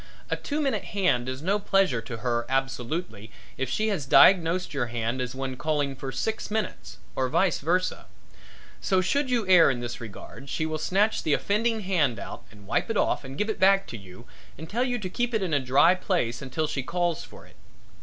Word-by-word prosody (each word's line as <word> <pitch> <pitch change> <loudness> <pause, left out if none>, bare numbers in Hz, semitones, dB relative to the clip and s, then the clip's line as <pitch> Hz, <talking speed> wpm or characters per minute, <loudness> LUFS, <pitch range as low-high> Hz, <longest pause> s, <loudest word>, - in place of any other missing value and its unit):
A - - +2
two 295 +1 -4
minute 275 -2 0
hand 160 - 0
is 130 +3 -5
no 200 +4 +1
pleasure 195 - +2
to 115 0 -7
her 120 -1 0
absolutely 135 - -3 0.2
if 130 -1 -3
she 215 +9 0
has 165 -10 -2
diagnosed 180 -2 +5
your 135 -4 -1
hand 120 +1 -2
as 125 0 -4
one 135 -1 -4
calling 145 -1 -1
for 135 0 -6
six 220 - -3
minutes, 215 -2 -4 0.2
or 130 -1 0
vice 190 +8 +2
versa. 180 +5 -1 0.7
So, 190 -2 +2
should 280 +9 0
you 235 -5 0
err 180 -4 +7
in 125 -3 -1
this 120 0 -6
regard 120 +5 -10
she 155 - -1
will 155 0 -3
snatch 205 +6 +1
the 155 - +1
offending 220 +6 +1
hand 165 - +1
out 100 - -8
and 105 -2 -16
wipe - - -1
it - - 0
off - - +1
and 135 0 -8
give 210 - 0
it 220 - -3
back 195 +1 +5
to - - -6
you 95 +2 -13 0.3
and 160 +3 -8
tell 235 +7 0
you 250 -1 -1
to 205 -5 -5
keep 240 +5 -2
it 215 - +1
in 175 -4 -2
a 145 - +4
dry 135 +7 +4
place 175 - -1
until 140 +4 -2
she 150 -3 -2
calls 175 +3 -1
for - - -14
it. - - -20
155 Hz, 215 wpm, -26 LUFS, 130-195 Hz, 0.7 s, err